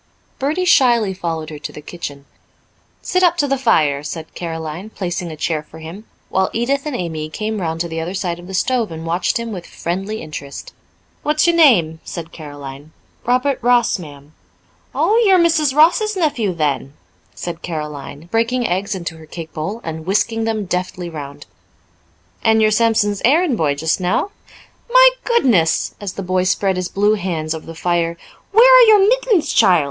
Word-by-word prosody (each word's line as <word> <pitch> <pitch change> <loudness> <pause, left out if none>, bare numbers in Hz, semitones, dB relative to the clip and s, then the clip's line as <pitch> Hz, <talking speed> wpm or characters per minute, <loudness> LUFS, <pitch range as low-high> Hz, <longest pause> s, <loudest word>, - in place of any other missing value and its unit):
Bertie 305 +7 0
shyly 235 - +4
followed 165 -4 -4
her 150 - -8
to - - -6
the - - -10
kitchen. 145 -3 -8 0.8
"Sit 365 - +1
up 350 -1 +4
to 290 - +1
the 275 - +1
fire," 155 - +2
said 155 +2 -7
Caroline, 165 +3 -6
placing 180 -4 -4
a - - -7
chair 155 0 -1
for 155 +1 -15
him, 165 +7 -9 0.2
while 190 0 +1
Edith 275 +5 -1
and 295 - -3
Amy 160 -6 -4
came 215 +4 -3
round 165 -1 -2
to 170 - -2
the 165 -1 -5
other 175 +4 -4
side 175 -3 -3
of 175 - -12
the 190 - -5
stove 235 0 0
and 160 0 -7
watched 170 +6 0
him 235 -1 -5
with 180 -4 -7
friendly 195 +5 -4
interest. 145 -3 -8 0.5
"What's 300 +1 +1
your 340 -1 +3
name?" 180 - +4
asked 165 -1 -7
Caroline. 145 -1 -10 0.3
"Robert 255 +3 +1
Ross, 240 -3 +3
ma'am." 145 -2 -12 0.6
"Oh, 450 +3 +3
you're 385 -3 +5
Mrs. 320 -5 +2
Ross's 380 +7 +4
nephew 270 - 0
then," 145 -4 -2 0.4
said 170 -1 -6
Caroline, 150 -2 -6
breaking 230 +2 +1
eggs 195 +3 -1
into 170 -3 -6
her 160 -1 -14
cake 165 0 -8
bowl, 195 +9 -4
and 160 0 -6
whisking 225 +3 0
them 220 -2 -1
deftly 180 -1 -3
round. 145 -3 -8 1.0
"And 220 -1 +4
you're 215 -1 +4
Sampson's 215 -2 +2
errand 295 +3 +3
boy 150 -8 0
just 160 +5 0
now? 185 - 0 0.6
My - - +7
goodness," 245 - +2
as 200 -2 -4
the 195 - -6
boy 185 0 0
spread 190 +1 +1
his 185 -1 -2
blue 205 +2 +2
hands 170 -6 -2
over 160 0 -8
the 165 - -8
fire, 170 0 -1 0.3
"where 460 +4 +7
are - - +8
your 415 -2 +6
mittens, 480 -7 +2
child? 180 -2 +5
185 Hz, 180 wpm, -18 LUFS, 160-245 Hz, 1.0 s, are